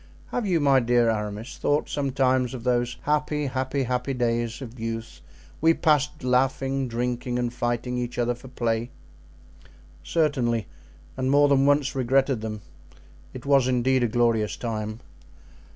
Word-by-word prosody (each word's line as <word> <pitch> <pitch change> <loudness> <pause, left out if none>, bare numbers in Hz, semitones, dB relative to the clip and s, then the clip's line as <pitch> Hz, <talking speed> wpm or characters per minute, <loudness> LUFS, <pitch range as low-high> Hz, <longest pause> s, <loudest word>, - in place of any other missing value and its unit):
"Have 240 -4 -1
you, 175 -3 +2
my 140 -2 +4
dear 120 -1 +3
Aramis, 105 +3 -4
thought 145 +1 +1
sometimes 130 -2 0
of 120 - -8
those 120 0 0
happy, 150 0 0
happy, 130 +1 -1
happy 125 +2 -2
days 120 -1 -1
of 125 -2 -9
youth 115 0 -5 0.4
we 165 +1 +5
passed 150 -1 +1
laughing, 135 +1 +1
drinking, 120 +1 -2
and 120 -1 -1
fighting 120 +1 -2
each 120 0 -4
other 120 0 +1
for 120 +2 -12
play?" 120 -2 -1 1.1
"Certainly, 125 - +1 0.5
and 130 0 -1
more 145 +1 +5
than 140 -1 +3
once 145 -1 +2
regretted 135 -1 +1
them; 110 -1 -5 0.7
it 130 - -8
was 140 -2 +4
indeed 130 +1 +2
a - - +3
glorious 115 -2 +1
time." 110 -1 -4
125 Hz, 145 wpm, -25 LUFS, 120-135 Hz, 1.1 s, we